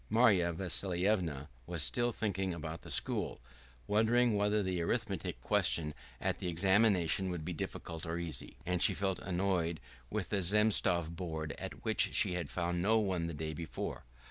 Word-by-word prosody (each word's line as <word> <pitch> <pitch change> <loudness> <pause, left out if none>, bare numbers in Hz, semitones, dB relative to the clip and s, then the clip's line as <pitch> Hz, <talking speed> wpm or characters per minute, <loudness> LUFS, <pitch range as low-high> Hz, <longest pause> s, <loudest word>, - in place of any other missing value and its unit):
Marya 100 -8 +4
Vassilyevna 90 -3 -1 0.2
was 85 -4 -1
still 120 - +1
thinking 95 -5 -1
about 80 0 -6
the - - -11
school, - - 0 0.5
wondering 115 +3 +3
whether 105 +1 +2
the 90 -2 -1
arithmetic 100 0 -2
questions 75 -2 +1 0.3
at - - -1
the - - -3
examination 95 0 +3
would 85 -3 -4
be 90 - -3
difficult 80 0 -5
or 85 +1 -2
easy. 80 -6 -4
And 90 -1 0
she 100 - +5
felt 95 -1 -1
annoyed 90 -3 0 0.3
with 105 -5 -3
the 100 -2 0
Zemstvo 95 -3 +3
board 80 -4 -4
at - - -7
which - - +2
she 90 - +3
had 85 -5 -3
found 85 +5 -1
no 110 +4 +4
one 95 -6 0
the 85 - -4
day 80 +1 -4
before. 80 -5 -5
90 Hz, 165 wpm, -34 LUFS, 85-100 Hz, 0.5 s, she